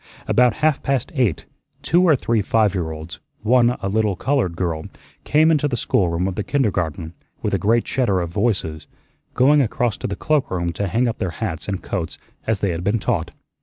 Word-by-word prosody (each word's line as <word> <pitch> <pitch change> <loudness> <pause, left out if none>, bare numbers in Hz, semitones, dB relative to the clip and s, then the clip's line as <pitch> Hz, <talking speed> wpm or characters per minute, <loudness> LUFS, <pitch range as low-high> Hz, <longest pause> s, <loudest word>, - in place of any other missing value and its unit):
About 125 -2 +4
half 155 -3 +2
past 135 +3 -1
eight, 105 - 0 0.4
two 175 +4 +3
or 170 -5 +5
three 115 -4 0
five 105 0 +2
year 90 -5 -2
olds, 80 +3 -8 0.2
one 120 +1 +3
a - - 0
little 105 0 +1
colored 120 -6 0
girl, 85 -3 -2 0.4
came 155 +2 +4
into 150 -2 +2
the 125 -4 -2
schoolroom 90 -3 +1
of 95 - -2
the 105 - -3
kindergarten 90 - -1 0.3
with - - -1
a - - +2
great 115 +3 +2
chatter 110 -8 +1
of 85 -2 -3
voices, 100 -7 -1 0.5
going 145 +3 +5
across 120 -2 0
to - - -4
the 100 - -3
cloakroom 95 - 0
to 100 +3 -2
hang 120 +7 +1
up 115 - -3
their 95 - -1
hats 85 -3 -4
and 95 -2 -3
coats 90 -5 -3 0.3
as 110 -3 0
they 100 - +1
had 85 +1 -4
been 100 +4 +1
taught. 105 -7 -1
105 Hz, 200 wpm, -21 LUFS, 90-125 Hz, 0.5 s, or